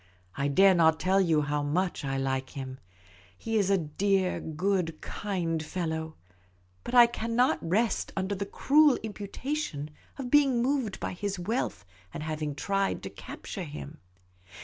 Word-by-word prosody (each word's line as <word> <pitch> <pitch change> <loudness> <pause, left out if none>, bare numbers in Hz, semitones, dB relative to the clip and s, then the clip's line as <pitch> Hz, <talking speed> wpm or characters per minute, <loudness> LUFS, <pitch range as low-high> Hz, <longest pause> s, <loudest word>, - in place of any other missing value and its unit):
I 140 - 0
dare 190 +7 +6
not 160 -2 +4
tell 190 +1 +3
you 160 -5 +3
how 145 0 -1
much 165 +4 -1
I 135 -1 -1
like 135 0 -1
him. 130 -1 -6 0.6
He 225 - -3
is 200 -2 +1
a 195 - +4
dear, 185 +4 0
good, 165 0 -1
kind 175 -6 -2
fellow. 160 -1 -3 0.7
But 250 - -4
I 240 -1 +10
cannot 235 +2 +1
rest 205 +6 0
under 190 +1 -1
the 200 0 -3
cruel 290 +5 +4
imputation 205 - -4 0.3
of 255 -3 -5
be 295 - +8
ing 265 -4 +1
moved 250 -4 0
by - - -3
his 200 +1 -3
wealth 175 - -2 0.3
and 150 - -6
having 155 -2 -3
tried 195 +6 -1
to - - -6
capture 195 - -7
him. 150 0 -8
185 Hz, 155 wpm, -29 LUFS, 155-210 Hz, 0.7 s, I